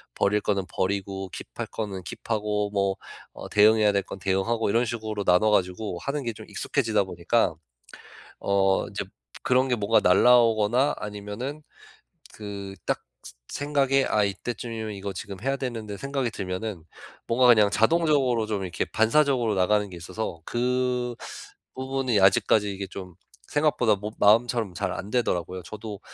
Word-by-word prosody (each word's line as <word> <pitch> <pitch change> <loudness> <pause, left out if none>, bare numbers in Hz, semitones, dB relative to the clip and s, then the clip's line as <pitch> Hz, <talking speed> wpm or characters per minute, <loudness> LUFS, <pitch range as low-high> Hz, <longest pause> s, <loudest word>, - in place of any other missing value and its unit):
버릴 105 +1 +2
거는 100 -2 0
버리고 95 0 -2
킵할 - - -7
거는 100 -4 -4
킵하고 105 +1 -2
뭐 100 -1 +1 0.4
어 - - -8
대응해야 105 0 +5
될 100 - +2
건 - - -9
대응하고 95 +5 0
이런 115 +4 +3
식으로 110 -3 -3
나눠 95 +3 +4
가지고 90 -1 0
하는 140 +1 -3
게 115 - -2
좀 110 0 -11
익숙해지다 110 -7 0
보니까 90 0 0 0.8
어 95 -1 +2
이제 - - -4 0.4
그런 130 +1 +3
게 125 - +1
뭐가 105 +2 +3
날아오거나 120 +5 +4
아니면은 105 +8 -6 0.7
그 100 -2 -7
딱 - - -1 0.5
생 145 0 -4
생각에 135 -2 +3
'아 105 - +3
이때쯤이면 110 +2 -4
이거 100 0 -5
지금 100 0 -7
해야 135 +3 0
되는데.' 115 -6 -5
생각이 140 0 -2
들면은 95 -1 -5 0.4
뭔가 125 +2 +4
그냥 105 -4 +6
자동적으로 135 -2 +2
좀 105 -3 -2
이렇게 90 -3 -2
반사적으로 120 -1 +2
나가는 105 +2 +2
게 90 - -9
있어서 85 +1 -5
그 125 0 -1 0.6
부분이 130 -3 0
아직까지 100 +2 +4
이게 100 0 -5
좀 90 -2 -9 0.3
생각보다 145 -7 +2
뭐 105 +2 -5
마음처럼 115 -1 +3
잘 - - -2
안되더라고요. 95 -5 -2
저도 105 +2 -8
105 Hz, 335 characters per minute, -26 LUFS, 100-120 Hz, 0.8 s, 그냥